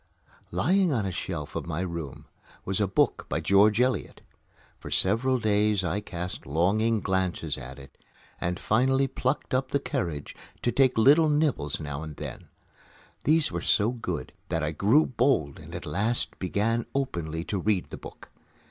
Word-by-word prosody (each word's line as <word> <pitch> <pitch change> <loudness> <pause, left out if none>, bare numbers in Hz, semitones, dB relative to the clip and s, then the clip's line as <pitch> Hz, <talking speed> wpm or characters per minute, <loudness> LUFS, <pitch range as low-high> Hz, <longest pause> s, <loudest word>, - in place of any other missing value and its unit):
Lying 185 +2 +2
on 115 -7 0
a 95 - -2
shelf 80 -4 -5
in - - -3
my 85 +1 -2
room 85 -6 -5 0.4
was 95 +2 -1
a 100 - +3
book 95 - +1
by - - 0
George 105 +3 +4
Eliot. 125 -5 0 0.6
For - - -8
several 115 +7 +2
days 105 -3 +2
I 90 +4 -1
cast 90 -6 -6
longing 105 - +2
glances 95 -5 -1
at 65 -1 -9
it 70 -1 -13 0.4
and 90 +1 -2
finally 130 +4 +2
plucked 130 +1 -2
up 130 +1 +1
the 140 - +1
courage 85 - -3 0.3
to 120 - +2
take 130 -2 +3
little 150 +7 +6
nibbles 145 - +1
now 75 -2 -5
and 80 -2 -7
then. - - -8 0.8
These 155 0 +3
were 85 -1 -3
so 105 +5 +2
good 90 -10 -5 0.2
that 80 -1 -1
I 75 - 0
grew 110 - +4
bold 120 - +1
and - - -10
at - - -6
last 110 +5 -1
began 110 +5 0
openly 85 - -2
to 100 +2 -2
read 100 -1 0
the - - -6
book. - - -12
100 Hz, 165 wpm, -27 LUFS, 85-125 Hz, 0.8 s, little